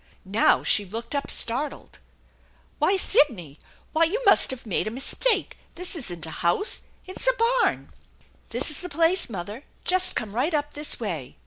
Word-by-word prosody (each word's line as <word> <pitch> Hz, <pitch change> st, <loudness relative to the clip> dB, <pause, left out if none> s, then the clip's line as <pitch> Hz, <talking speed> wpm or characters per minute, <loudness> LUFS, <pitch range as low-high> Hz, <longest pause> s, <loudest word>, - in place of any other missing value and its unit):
Now 205 Hz, +4 st, +3 dB
she 205 Hz, -, +3 dB
looked 225 Hz, +7 st, -7 dB
up 285 Hz, -1 st, -2 dB
startled. 260 Hz, +6 st, -2 dB, 0.8 s
"Why, 390 Hz, -, +3 dB
Sidney! 215 Hz, -, +2 dB, 0.3 s
Why, 325 Hz, +1 st, +4 dB
you 390 Hz, +9 st, -1 dB
must -, -, +6 dB
have 260 Hz, -2 st, -4 dB
made 215 Hz, 0 st, -1 dB
a -, -, 0 dB
mistake! 270 Hz, -, +2 dB, 0.2 s
This 360 Hz, +1 st, -3 dB
isn't 175 Hz, -, -5 dB
a 160 Hz, -, -8 dB
house; 180 Hz, -, 0 dB, 0.2 s
it 370 Hz, -, -8 dB
is -, -, -1 dB
a -, -, +4 dB, 0.3 s
barn! -, -, -1 dB, 0.2 s
" -, -, -33 dB
" -, -, -34 dB
This -, -, -1 dB
is 300 Hz, -, 0 dB
the 360 Hz, -, -6 dB
place, 330 Hz, +3 st, +1 dB
mother. 205 Hz, +5 st, -7 dB, 0.2 s
Just 370 Hz, 0 st, +2 dB
come 215 Hz, -3 st, -4 dB
right 280 Hz, +8 st, 0 dB
up 295 Hz, 0 st, -2 dB
this 295 Hz, +1 st, -3 dB
way." 165 Hz, -, -5 dB
270 Hz, 185 wpm, -25 LUFS, 205-340 Hz, 0.8 s, must